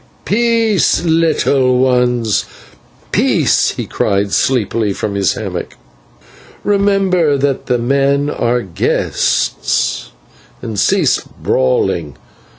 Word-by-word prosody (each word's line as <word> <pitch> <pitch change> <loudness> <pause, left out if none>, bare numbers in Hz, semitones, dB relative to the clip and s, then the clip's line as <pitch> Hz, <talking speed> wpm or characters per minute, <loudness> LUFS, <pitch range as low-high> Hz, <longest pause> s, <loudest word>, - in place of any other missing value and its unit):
"Peace, 225 -6 +1
little 150 -6 +2
ones, 125 -4 +1 0.7
peace!" - - +2
he - - -3
cried 100 0 -1
sleepily 110 -4 0
from 100 +1 -4
his 100 -3 +1
hammock. - - -6 0.9
"Remember 195 -6 +2
that 140 -1 -1
the 125 - +1
men 140 +3 +1
are 120 -4 -1
guests, 65 -7 -1 0.5
and 110 -3 -5
cease - - +2
brawling. 65 +3 -1
130 Hz, 90 wpm, -15 LUFS, 105-160 Hz, 0.9 s, little